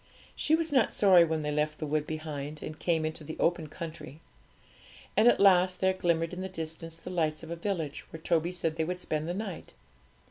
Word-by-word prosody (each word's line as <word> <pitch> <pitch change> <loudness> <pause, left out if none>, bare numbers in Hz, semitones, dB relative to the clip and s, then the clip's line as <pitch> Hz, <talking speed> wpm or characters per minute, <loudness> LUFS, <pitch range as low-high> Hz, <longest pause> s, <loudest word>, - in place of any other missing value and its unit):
She 310 - +2
was 325 -1 -1
not 260 -6 +3
sorry 185 -4 +6
when 160 -2 -1
they 150 - -1
left 150 +1 0
the 155 - -4
wood 150 0 -1
behind 155 -1 -5
and 155 - -7
came 165 -3 +1
into 155 0 -4
the 155 +2 -7
open 170 -2 +1
country. 155 -2 -8 1.0
And 220 - +5
at 240 - +5
last 185 -2 +5
there 190 0 +3
glimmered 170 -2 0
in 180 - -5
the 190 - -4
distance 165 -1 -6
the 180 - -8
lights 155 -3 -1
of 165 - -8
a - - -2
village, 165 -5 -3
where 160 - -8
Toby 165 +1 +1
said 165 -3 -2
they 160 - +1
would 180 +2 -3
spend 155 -2 -2
the 175 - -2
night. 200 -3 -6
165 Hz, 215 wpm, -29 LUFS, 155-180 Hz, 1.0 s, sorry